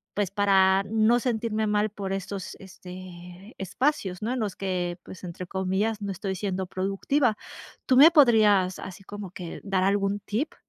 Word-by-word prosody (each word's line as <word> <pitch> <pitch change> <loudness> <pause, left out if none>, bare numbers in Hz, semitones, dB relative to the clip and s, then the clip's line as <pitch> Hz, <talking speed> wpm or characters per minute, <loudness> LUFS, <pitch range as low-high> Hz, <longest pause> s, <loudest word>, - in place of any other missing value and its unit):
pues 200 -2 -1
para 195 -1 +4
no 225 +2 +3
sentirme 220 -3 -1
mal 210 +1 +1
por 200 -2 -5
estos 195 0 -5
este 185 +1 -11
espacios, 195 - -1
¿no? 235 - -1
En 255 - -2
los 210 -3 -2
que 180 -2 -2
pues 185 - -12
"entre 180 +1 -6
comillas", 195 +4 -1
no 200 - -3
estoy 190 +1 -4
siendo 190 -1 -3
productiva, 210 +7 0 0.5
¿Tú 255 - +4
me 300 +5 +10
podrías 215 - +4
así 190 +1 -9
como 205 -1 -8
que 175 -3 -8
dar 195 -2 0
algún 200 +1 +1
tip? 235 +10 -3
195 Hz, 165 wpm, -26 LUFS, 185-215 Hz, 0.5 s, me